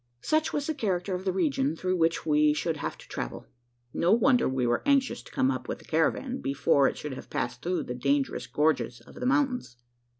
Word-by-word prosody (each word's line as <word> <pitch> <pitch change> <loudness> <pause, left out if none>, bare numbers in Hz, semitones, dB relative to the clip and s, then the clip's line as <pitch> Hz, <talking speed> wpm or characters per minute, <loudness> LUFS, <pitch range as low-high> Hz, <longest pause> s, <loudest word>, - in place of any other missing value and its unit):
Such 310 0 +1
was 290 -1 -1
the 315 - -1
character 190 - -1
of 180 +1 -4
the 190 - +2
region 150 -5 0
through 185 +2 -1
which 165 -1 +1
we 150 -1 +4
should 160 0 -1
have - - -4
to - - -15
travel. - - -5 0.5
No 175 - +2
wonder 245 - +4
we 130 -1 0
were 120 0 +1
anxious 275 -4 +2
to - - -15
come 130 - +2
up 130 - -4
with - - -3
the - - -17
caravan, 245 - 0
before 140 0 +3
it - - -2
should 150 -2 -5
have 130 - -9
passed 125 +1 -3
through 180 +4 -1
the 125 - -5
dangerous 140 +2 0
gorges 135 -6 +1
of - - -16
the 250 - -3
mountains. 265 - 0
165 Hz, 220 wpm, -28 LUFS, -, 0.5 s, we